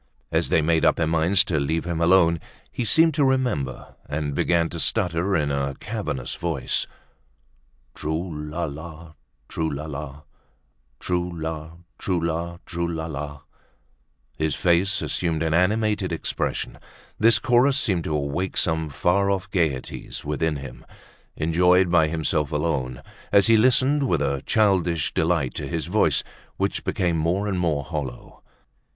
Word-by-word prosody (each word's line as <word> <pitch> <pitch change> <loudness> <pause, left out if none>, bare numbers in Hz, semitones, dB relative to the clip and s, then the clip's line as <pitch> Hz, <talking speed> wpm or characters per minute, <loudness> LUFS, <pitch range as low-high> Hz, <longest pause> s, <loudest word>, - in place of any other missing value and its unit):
As - - +1
they 80 - +3
made 80 0 +2
up - - +5
their 85 - 0
minds 85 +4 +3
to 85 -5 -1
leave 80 +4 -1
him 85 -1 -2
alone, 85 -1 +4 0.3
he 125 - -3
seemed 160 +7 +4
to 145 0 +2
remember, 125 - -1
and 75 -1 -2
began 85 +3 +2
to 85 - -6
stutter 90 +3 +1
in 75 -4 +1
a 70 -1 -1
cavernous 105 - -4
voice: - - -1 1.1
"Trou 80 +4 -3 0.2
la 85 +3 -3
la, 80 +1 -7 0.3
trou 80 -1 -2
la 75 +1 -5
la, 75 -1 -7 0.8
Trou 90 0 -1
la, 80 0 -5 0.3
trou 90 -2 0
la, 85 +1 -2
trou 85 -1 -2
la 80 -1 -3
la!" 75 -2 -6 1.0
His 80 -2 0
face 95 +2 +2
assumed 80 -2 -1
an 80 -1 0
animated 105 +2 +1
expression, 80 - -3 0.4
this 115 0 +6
chorus 130 +3 +3
seemed 95 - 0
to 75 - -1
awake 75 +6 -2
some 80 -2 +1
far 95 +8 +1
off 95 -1 -2
gaieties 80 -9 -2
within 75 +1 -1
him, 70 -2 -8 0.5
enjoyed 90 +3 +3
by 80 -3 +4
himself 75 -2 -1
alone, 70 -5 -2 0.3
as 100 -1 +5
he 115 - +5
listened 130 +5 +3
with - - +1
a 70 -1 -1
childish 90 -8 +2
delight 80 -5 +1
to - - -5
his 80 -2 -2
voice 85 -7 +2 0.3
which - - -1
became 85 -3 0
more 90 +6 0
and 95 -3 -1
more 80 -5 0
hollow. 70 -5 -6
85 Hz, 150 wpm, -24 LUFS, 75-95 Hz, 1.1 s, this